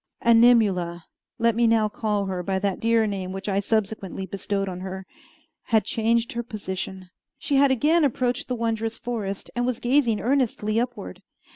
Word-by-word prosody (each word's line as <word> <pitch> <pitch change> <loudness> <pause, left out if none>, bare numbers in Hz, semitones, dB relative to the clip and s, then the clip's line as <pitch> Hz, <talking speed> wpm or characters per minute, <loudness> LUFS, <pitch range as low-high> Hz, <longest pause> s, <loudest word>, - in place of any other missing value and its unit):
Animula 210 -8 +4 0.3
(let 230 -1 +2
me 235 0 +3
now 225 -1 +3
call 210 -1 -1
her 185 -2 -3
by 190 +2 -1
that 195 -1 -1
dear 230 0 +3
name 195 -3 -3
which 190 +1 -6
I 195 -1 +1
subsequently 200 -2 -2
bestowed 195 0 -3
on 180 -1 -5
her) 190 0 -6 0.6
had 220 -3 +3
changed 230 +3 0
her 235 - -3
position. 190 -4 -6 0.3
She 280 - 0
had 280 0 +5
again 300 +6 +3
approached 250 -2 0
the 250 - -2
wondrous 225 -1 -2
forest, 210 -5 -5
and 245 - 0
was 245 -1 -1
gazing 240 -4 +2
earnestly 225 -2 0
upward. 235 - -5
220 Hz, 165 wpm, -24 LUFS, 195-235 Hz, 0.6 s, had